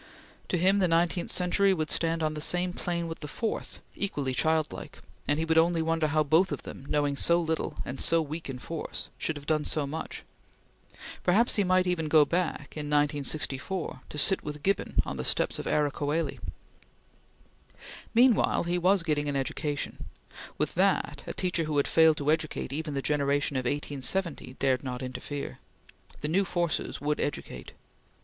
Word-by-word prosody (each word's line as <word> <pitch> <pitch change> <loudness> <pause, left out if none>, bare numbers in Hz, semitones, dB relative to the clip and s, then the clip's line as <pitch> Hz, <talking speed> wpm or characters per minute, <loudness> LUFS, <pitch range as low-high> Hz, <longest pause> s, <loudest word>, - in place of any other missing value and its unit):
To 180 - 0
him 190 +4 +4
the 185 - +3
nineteenth 170 +1 +1
century 190 +2 +3
would 155 -2 -2
stand 165 -1 0
on 155 0 0
the 150 - -5
same 180 +3 0
plane 170 -2 -2
with 165 - -6
the 150 - -6
fourth 220 +9 -4
equally 145 -10 -2
childlike 155 +3 0 0.3
and 145 - +2
he 160 - 0
would 160 0 +4
only 165 0 +3
wonder 165 -1 +1
how 155 +1 +2
both 160 +6 +3
of 145 - -4
them, 135 - -9
knowing 145 -1 +1
so 170 +4 +5
little, 160 -2 -2
and 130 - -4
so 165 - +3
weak 160 0 -4
in 130 - -4
force, 160 +5 -5
should 160 - -1
have 145 -1 -9
done 155 0 +1
so 150 -1 -1
much. 155 +3 -5 1.0
Perhaps 210 +5 +3
even 185 -1 +4
he 180 -1 +1
might 160 -2 -3
go 150 -1 +6
back, 170 -2 -2
in 150 -1 -4
1964, 145 +3 -1
to - - -7
sit 190 +6 +4
with 150 -1 -6
Gibbon 195 0 0
on 70 - -5
the 65 - -3
steps - - +1
of - - -5
Ara 150 -1 +2
Coeli. 150 +4 -2 1.8
Meanwhile 240 -2 +4
he 175 +1 0
was 185 +1 +3
getting 150 -3 0
education. 140 +2 -2 0.5
With - - -1
that, - - +1
a - - -4
teacher 180 -3 0
who 150 -1 -1
had 140 - +3
failed 160 -1 +5
to 145 +1 +1
educate 155 -4 -1
even 150 -1 -3
the 135 - -2
generation 145 -1 +1
of 130 -1 -1
1870, 145 +2 -2
dared 130 -1 +1
not 125 -1 -4
interfere. 140 +3 -5 0.6
The 150 - -1
new 185 +6 +2
forces 175 -3 -1
would 150 +1 -1
educate. 145 - -4
155 Hz, 175 wpm, -28 LUFS, 145-175 Hz, 1.8 s, go